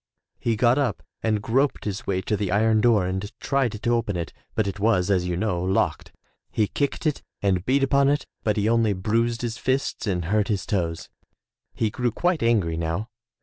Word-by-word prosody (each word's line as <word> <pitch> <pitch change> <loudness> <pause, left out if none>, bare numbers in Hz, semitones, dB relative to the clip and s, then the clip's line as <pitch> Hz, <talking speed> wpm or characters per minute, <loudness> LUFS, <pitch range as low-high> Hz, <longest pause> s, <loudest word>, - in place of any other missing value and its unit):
He 115 - 0
got 120 +5 +3
up 140 -3 -1 0.2
and 110 -2 0
groped 135 +5 +1
his 100 -2 -4
way 95 -1 0
to 105 - -1
the 100 -3 -2
iron 110 +2 +3
door 110 -5 +4
and 95 +3 -3
tried 135 -5 0
to - - +1
open 110 -5 0
it, 85 -1 -4 0.2
but 110 - +1
it 100 0 -4
was, 100 -3 +2
as 90 -2 +2
you 90 -1 -1
know, 95 -4 0
locked. 95 +1 0 0.4
He 110 - +1
kicked 140 +8 -2
it 150 -2 0 0.2
and 95 -3 +2
beat 135 +2 +3
upon 140 0 +4
it, 145 +1 +1 0.2
but 105 -1 +1
he 105 +1 +1
only 115 -2 +3
bruised 115 +5 0
his 120 0 -3
fists 130 -3 -1
and 90 -4 -1
hurt 105 +3 +1
his 100 -4 -1
toes. 85 -5 -2 0.7
He 110 -2 0
grew 125 +2 0
quite 175 - 0
angry 105 -9 +2
now. 85 +7 -2
110 Hz, 200 wpm, -24 LUFS, 95-120 Hz, 0.7 s, door